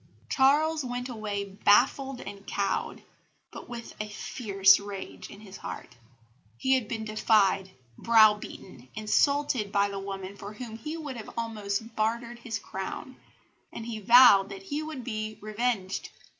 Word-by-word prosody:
Charles 300 +3 +3
went 245 0 -4
away 210 -4 -3
baffled 245 +7 +2
and 200 0 -9
cowed, 200 -1 -2 0.5
but - - -10
with 235 -1 -7
a 215 - -5
fierce 195 -3 +3
rage 200 -1 -8
in 200 - -12
his 195 -3 -11
heart. 125 - -8 0.6
He 265 - +2
had 255 -5 +1
been 220 0 -4
defied, 205 -3 +2 0.3
browbeaten, 210 - +2
insulted 240 0 +1
by 200 0 +2
the 200 0 -5
woman 195 0 -6
for 200 0 -9
whom 225 0 -8
he 305 +8 -5
would 280 -7 -6 0.2
almost 215 -3 -2
have 225 0 -14
bartered 235 +2 -1
his 235 -2 -4
crown; 195 +7 -7 0.5
and 225 - -7
he 225 -2 -5
vowed 215 -3 +7
that 195 -1 -9
he 285 +9 -3
would 310 -5 -6
be 215 -2 -4
revenged. 215 -2 -2
215 Hz, 145 wpm, -28 LUFS, 200-245 Hz, 0.6 s, vowed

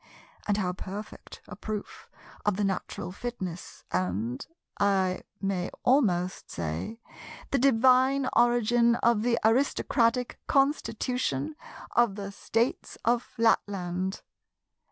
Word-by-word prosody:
And 205 -1 +2
how 180 -3 0
perfect 200 +3 -8
a 205 - -8
proof 210 0 -6 0.3
of 205 -2 +1
the 210 - 0
natural 190 -2 -3
fitness 185 -5 -6
and, 95 +7 -1 0.4
I 190 -2 +2 0.2
may 190 -2 -1
almost 190 -9 +2
say, 80 - -4 0.5
the 275 - +2
divine 260 +1 +4
origin 240 0 +4
of 235 -2 +2
the 235 +1 +2
aristocratic 245 0 +2
constitution 250 - 0 0.4
of 235 -4 +3
the 200 -1 -5
States 230 +4 -1
of 235 +1 +3
Flatland! 190 -5 0
210 Hz, 105 wpm, -28 LUFS, 185-240 Hz, 0.5 s, divine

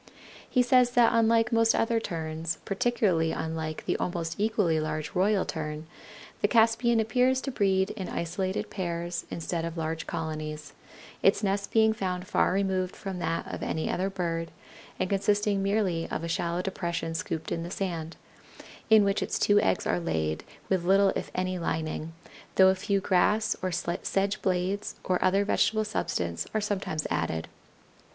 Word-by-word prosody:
He 250 - +3
says 250 0 +5
that 240 -1 +5
unlike 230 +1 +3
most 230 0 +4
other 225 0 +2
Terns, 160 -4 -3
particularly 195 -6 +1
unlike 160 -1 -4
the - - 0
almost 170 -2 -2
equally 205 -7 +2
large 155 0 -3
Royal 195 +2 +2
Tern, 155 -1 -4 0.6
the - - +4
Caspian 230 0 +3
appears 250 +4 +2
to 270 - -3
breed 190 -4 +2
in 195 -4 -5
isolated 185 +3 -2
pairs 170 -2 -3
instead 170 0 -3
of 165 0 -4
large 160 0 -3
colonies, 155 -1 -5 0.5
its 200 +2 +3
nest 200 0 0
being 220 -1 +4
found 185 -3 -3
far - - +2
removed 190 -1 0
from 190 -2 -5
that 165 -1 -1
of - - -5
any 160 - -1
other 190 +2 0
bird, 170 -3 -2 0.5
and - - +1
consisting 205 +1 +1
merely 195 -4 0
of - - -3
a - - -2
shallow 170 +1 -1
depression 170 -3 -3
scooped 160 -1 -4
in 165 - -1
the 170 - -5
sand, 170 -4 -4 0.7
in 220 -1 +7
which 200 0 +1
its - - -1
two 205 0 +4
eggs - - +1
are - - +1
laid, 80 - -2 0.2
with 185 -3 +1
little 195 +2 +5
if - - -3
any 185 0 -1
lining, 160 -1 -3 0.4
though 190 0 +7
a - - +4
few 195 +1 0
grass 200 +4 +2
or 185 - -1
sedge 195 +4 -1
blades 190 +2 -1
or 180 -1 0
other 195 +2 +3
vegetable 215 +1 +2
substance 85 - -2
are - - +3
sometimes 195 -7 -2
added. 80 0 -1
185 Hz, 160 wpm, -28 LUFS, 165-205 Hz, 0.7 s, in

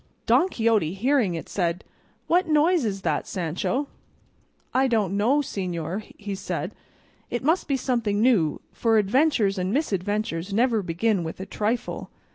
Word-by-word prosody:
Don 370 - +4
Quixote, 220 - +1
hearing 235 -4 +2
it, 165 - -6
said, 175 -2 -1 0.4
"What 355 +2 +2
noise 315 0 +3
is 195 -2 -2
that, 155 -3 0
Sancho?" 185 - -2 0.9
"I 265 +1 +3
don't 210 -6 +1
know, 245 +9 +3
señor," 180 - -3 0.3
said 190 - -4 0.6
he; - - -3
"it 240 - -2
must 320 +6 +2
be 275 - +1
something 235 -5 0
new, 210 - +3
for 225 -1 +2
adventures 215 -2 +2
and 185 +1 -1
misadventures 205 - -1
never 230 -1 +3
begin 185 +2 0
with 160 +2 -6
a 190 - -5
trifle." 220 +4 -2
215 Hz, 145 wpm, -25 LUFS, 185-255 Hz, 0.9 s, Don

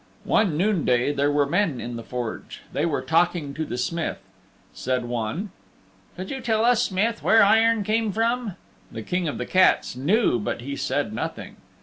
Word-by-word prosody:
One 180 -9 +2
noonday 155 - +1
there 145 0 +1
were 145 0 +2
men 165 -3 0
in 120 0 -5
the 115 - -5
Forge. 120 -1 -6
They 150 +4 0
were 145 -5 -1
talking 160 0 +1
to 160 - -3
the 120 - -5
Smith. 170 +6 -2 0.6
Said 130 -1 -2
one, 120 - -3 0.6
"Could 185 +1 -6
you 265 -1 -4
tell 225 -1 +1
us, 245 -1 +4
Smith, 230 +1 0
where 225 -1 +5
iron 225 +1 +4
came 220 +1 0
from?" 230 -1 -1 0.4
The 110 - -6
King 180 - -1
of 145 - -3
the - - -3
Cats 185 -8 +3
knew 150 - +2
but 105 - -3
he 140 +3 -5
said 135 -5 -2
nothing. - - -5
170 Hz, 180 wpm, -24 LUFS, 130-215 Hz, 0.6 s, where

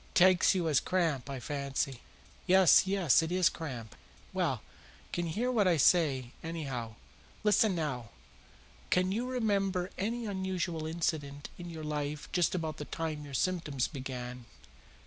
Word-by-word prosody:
Takes 185 +1 +6
you 175 -3 0
as 145 -4 +4
cramp, 160 -8 0
I 135 -1 -4
fancy." 140 -1 -3 0.5
"Yes, 190 0 +6
yes; 190 -8 +4
it 160 +1 -3
is 180 -1 +4
cramp." 125 -9 -7 0.4
"Well, - - 0
you - - -24
can 175 - -1
hear 235 +10 -1
what 215 -6 +3
I 175 -3 +4
say, 135 -6 +3
anyhow. 135 -9 -4 0.5
Listen 210 -1 +4
now! 135 -9 -3 0.8
Can 185 +1 +2
you 235 +5 -1
remember 195 -7 0
any 230 +4 -1
unusual 185 -5 -2
incident 150 -3 -2
in 175 0 -7
your 160 -2 -7
life 150 -1 -3
just 175 0 +2
about 160 -3 -3
the 150 - -5
time 155 -2 -4
your 140 -2 -7
symptoms 155 -6 0
began?" 125 -3 -6
165 Hz, 145 wpm, -31 LUFS, 140-185 Hz, 0.8 s, Takes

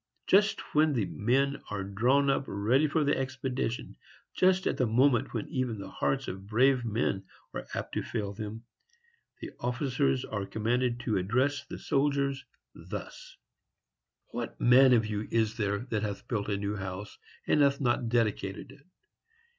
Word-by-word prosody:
Just 205 +2 +4
when 155 0 +4
the 115 -6 +1
men 130 +9 0
are 105 -2 -3
drawn 120 +9 +2
up 135 - 0
ready 120 +9 +2
for 155 +1 +1
the 145 - +2
expedition,—just 130 +8 -2
at - - 0
the 125 - +2
moment 120 +2 +3
when 115 - -3
even 130 -4 -2
the 100 - -8
hearts 135 -1 -1
of 95 +1 -6
brave 125 +4 +3
men 110 -3 -1 0.3
are - - -6
apt - - -4
to - - 0
fail 100 -1 -3
them,—the 120 - -11
officers 120 - 0
are 100 -2 -4
commanded 120 +2 0
to 110 -4 0
address 130 +9 0
the - - -7
soldiers 140 -1 0 0.3
thus: - - -8 0.9
"What - - -5
man 130 +2 +6
of 115 -2 +4
you 105 0 -3
is 115 -1 +1
there 100 -2 0
that 110 -2 0
hath 100 -2 -4
built 105 -3 -2
a 100 - 0
new 100 +1 -2
house, 95 +1 -6 0.3
and 150 - +3
hath 140 -1 +3
not 120 -3 +1
dedicated 110 -2 -1
it? 140 +2 -18
120 Hz, 155 wpm, -29 LUFS, 105-140 Hz, 0.9 s, man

